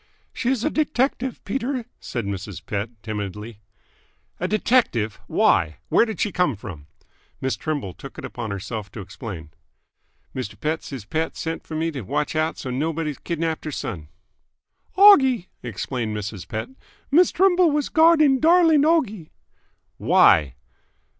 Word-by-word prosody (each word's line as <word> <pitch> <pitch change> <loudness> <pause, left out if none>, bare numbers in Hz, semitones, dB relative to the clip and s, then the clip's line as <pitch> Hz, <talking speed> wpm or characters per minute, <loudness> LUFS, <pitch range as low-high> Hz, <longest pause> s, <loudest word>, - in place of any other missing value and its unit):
"She 250 - -1
is 260 -4 0
a 310 - +1
detective, 265 -4 -1
Peter," 255 +2 -2
said 120 -4 -4
Mrs. 100 -1 -6
Pett 105 +2 -3
timidly. 105 0 -6 0.8
"A 180 - -1
detective? 205 - +1
Why? 80 - +2
Where - - +4
did 220 -6 -6
she 210 - 0
come 180 -8 +1
from?" 85 -8 -10 0.5
Miss 130 0 -1
Trimble 145 - -3
took - - -11
it - - -6
upon 120 -3 -6
herself 100 +1 -5
to - - -7
explain. 95 - -8 0.8
"Mister 105 -5 -5
Pett, 155 +8 -2
siz 130 -7 -8
Pett 160 +8 -2
sent 165 0 -4
f'r 155 - -6
me 165 +1 -1
t' 140 -4 -5
watch 145 +10 -2
out 155 +1 0
so's 125 - -5
nobody 155 +2 -1
kidnapped 165 -2 -2
her 155 - -3
son." 105 - -5 0.9
"Oggie," 265 - +6
explained 115 -1 -4
Mrs. 100 -3 -6
Pett. 110 - -4 0.4
"Miss 350 +5 +6
Trimble 365 -1 +4
was 295 -1 0
guarding 315 -4 +5
darling 325 -1 +5
Oggie." 235 - +1 0.7
"Why?" 65 -5 +4
155 Hz, 145 wpm, -23 LUFS, -, 0.9 s, Oggie